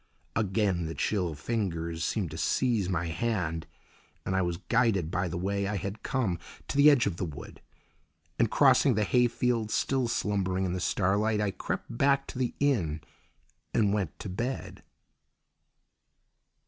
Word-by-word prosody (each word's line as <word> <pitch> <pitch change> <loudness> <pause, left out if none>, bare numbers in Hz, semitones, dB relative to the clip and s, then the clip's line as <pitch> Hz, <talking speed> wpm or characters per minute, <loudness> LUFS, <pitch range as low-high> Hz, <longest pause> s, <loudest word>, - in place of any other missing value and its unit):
Again 95 -5 +1
the 80 - -5
chill 85 +2 -1
fingers 85 -4 -2
seemed - - -1
to - - -6
seize 115 -8 +1
my 85 -2 0
hand, 85 -4 -2 0.6
and 95 - -1
I 95 - +3
was 85 -2 -1
guided 110 -7 +1
by 90 0 0
the 85 0 -4
way 100 +2 -1
I 105 - -2
had 100 +2 -4
come 115 -11 -1 0.3
to - - -3
the 145 +1 +8
edge 140 -5 +4
of 95 -4 -2
the - - -2
wood, 75 -5 -8 0.8
and - - +3
crossing - - +5
the 105 - +2
hayfield 120 0 +1
still 130 +2 +1
slumbering 95 -4 0
in 90 - -1
the 90 - -2
starlight, 105 +4 +1
I 105 -1 +1
crept 115 - -5
back 140 +2 +3
to 125 - -6
the 125 -2 -1
inn 90 - +1 0.7
and 105 -3 +3
went 95 -8 -2
to - - -5
bed. 120 +8 -4
100 Hz, 160 wpm, -29 LUFS, 90-115 Hz, 0.8 s, the